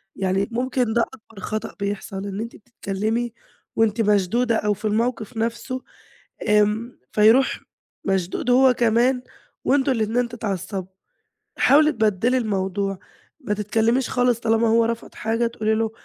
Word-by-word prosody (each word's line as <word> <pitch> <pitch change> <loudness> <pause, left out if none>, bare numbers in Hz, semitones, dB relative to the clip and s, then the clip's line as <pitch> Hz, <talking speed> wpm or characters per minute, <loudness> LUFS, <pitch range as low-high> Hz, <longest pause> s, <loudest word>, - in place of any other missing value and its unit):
يعني 195 +3 0
ممكن 250 -1 0
ده 235 - +3
أكبر 225 -4 -7
خطأ 215 +3 -4
بيحصل 200 -1 -4
إن 200 0 -5
أنتِ 230 +2 -5
بتتكلِّمي 220 +1 -3 0.4
وأنتِ 225 0 +2
مشدودة 210 +3 +2
أو 210 -1 +1
في 205 +2 -9
الموقِف 225 +1 -1
نَفْسه، 235 +4 -2 0.7
آمم 210 +3 +2
فيروح 225 +5 +4 0.4
مشدود 190 +4 -1
هو 255 0 +6
كمان 240 +3 +2 0.4
وأنتم 270 0 +3
الاتنين 235 +1 0
تتعصّبوا. 195 -5 -4 0.7
حاولي 305 +2 +5
تبدّلي 220 +1 +1
الموضوع، 195 -3 -1 0.4
ما 240 -8 -2
تتكلِّميش 225 +5 +1
خالص 245 -2 +2
طالما 225 0 +2
هو 230 +1 +4
رفض 230 0 -4
حاجة 225 +2 0
تقولي 220 -1 -1
له، 220 0 0
225 Hz, 130 wpm, -23 LUFS, 210-240 Hz, 0.7 s, هو